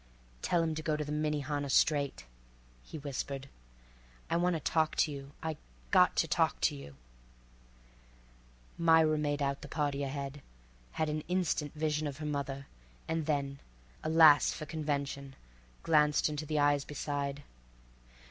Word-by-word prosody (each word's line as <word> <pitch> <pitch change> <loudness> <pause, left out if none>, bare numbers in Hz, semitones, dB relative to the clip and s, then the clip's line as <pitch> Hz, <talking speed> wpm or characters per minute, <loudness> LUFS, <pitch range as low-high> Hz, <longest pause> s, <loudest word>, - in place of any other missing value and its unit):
"Tell 170 -1 +2
him 160 -1 0
to 155 - -4
go 155 -1 0
to 150 - -3
the 145 - -5
Minnehaha 150 -1 -1
straight," 140 0 +2 0.6
he 155 - -9
whispered. 140 -1 -4 0.8
"I - - +2
wanta 175 -1 +1
talk 155 +2 +1
to 155 - +2
you—I 145 +3 -6 0.3
got - - +5
to - - +2
talk - - +1
to - - +2
you." 70 0 -10 1.8
Myra 160 -2 +5
made 145 -1 0
out 140 0 -1
the - - -8
party 145 -2 -1
ahead, 140 0 -4 0.5
had 155 - 0
an 155 0 -2
instant 170 -4 -1
vision 155 0 0
of 140 -2 -5
her 155 - -6
mother, 140 -2 -3 0.4
and 160 -1 -2
then—alas 140 - +3
for 155 - -6
convention—glanced 140 - -1
into 150 0 -4
the 155 - -1
eyes 145 -1 +3
beside. 145 -1 -3
145 Hz, 135 wpm, -32 LUFS, 140-155 Hz, 1.8 s, got